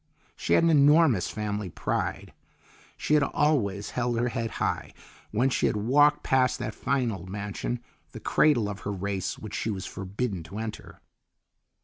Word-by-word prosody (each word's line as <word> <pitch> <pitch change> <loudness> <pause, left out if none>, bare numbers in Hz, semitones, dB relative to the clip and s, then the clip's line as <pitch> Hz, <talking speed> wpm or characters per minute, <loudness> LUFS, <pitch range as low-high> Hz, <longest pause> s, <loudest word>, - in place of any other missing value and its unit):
She 85 - -1
had - - +5
an 165 - +4
enormous 145 - +5
family 105 -2 -3
pride. - - -3 0.6
She - - -1
had 150 - +5
always 125 -10 +1
held 120 -1 -1
her 120 +1 +1
head 115 -2 -2
high - - -2 0.3
when 125 +5 +1
she - - +2
had - - 0
walked 145 +7 +4
past 130 -1 +2
that 110 - -4
fine 130 0 0
old 95 -3 -7
mansion, 105 +4 -4 0.3
the - - -8
cradle 125 -9 +3
of 100 -1 -5
her 100 - -4
race, 100 -1 -3
which 110 -1 -9
she 110 - -2
was 95 -3 -3
forbidden 95 0 -4
to 95 +5 -8
enter. 110 -1 -7
110 Hz, 165 wpm, -27 LUFS, 100-130 Hz, 0.6 s, had